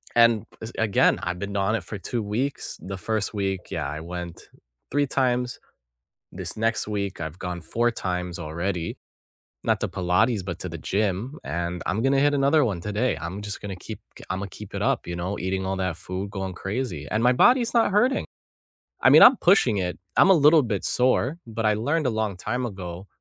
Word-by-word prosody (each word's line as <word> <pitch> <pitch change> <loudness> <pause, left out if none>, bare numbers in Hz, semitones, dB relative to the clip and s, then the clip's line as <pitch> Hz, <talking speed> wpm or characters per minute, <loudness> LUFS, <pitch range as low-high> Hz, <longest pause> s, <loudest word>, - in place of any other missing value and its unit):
and 115 -2 +5 0.2
es 110 +1 -6
again, 110 -3 +3
I've 90 0 -3
been 100 0 -5
on 100 +2 +1
it 105 - -3
for 105 - -6
2 115 +4 -3
weeks. 120 +7 -3
The 95 0 -6
1st 110 +3 -2
week, 95 -3 -3
yeah, - - -2
I 75 +2 -5
went 85 0 -7 0.4
3 145 0 +2
times. 125 -2 0 0.7
This - - -5
next 115 0 0
week 100 -4 -3
I've 80 +2 -6
gone 90 -2 -4
4 120 +6 0
times 90 -4 -3
already, 85 +2 -3 0.7
not - - +2
to - - 0
Pilates, 95 +4 +1
but 90 -3 -5
to 90 - -4
the 85 -1 -7
gym, 105 - -1
and 85 +1 -3
I'm 105 +5 0
gonna 135 +1 +3
hit 145 0 +3
another 145 +2 +4
one 100 -8 -1
today. 105 +7 0
I'm 95 +4 -5
just 105 -1 -5
gonna 100 -2 -6
keep, - - -8 0.2
g - - -11
Imma 95 +1 -3
keep 105 +1 -11
it - - -2
up, - - 0
you 85 - -4
know, 90 +4 -3
eating 95 +1 -2
all 95 0 -1
that 95 -3 -2
food, 95 +3 -5
going 95 -2 -4
crazy, 95 - -4
and 110 +2 0
my 125 +1 +5
body's 245 - +4
not 230 -3 +4
hurting. 245 +7 +3 0.8
I - - +5
mean, - - +9
I'm 255 - +9
pushing 135 - +4
it, 90 -1 -2 0.2
I'm - - +7
a - - +8
little 155 0 +6
bit 110 -6 -2
sore, 130 +5 +2
but 115 0 -4
I 105 - +4
learned 145 +7 0
a - - +2
long 110 -3 -1
time 120 +7 -2
ago, 95 -2 -7
100 Hz, 205 wpm, -25 LUFS, 90-125 Hz, 0.8 s, mean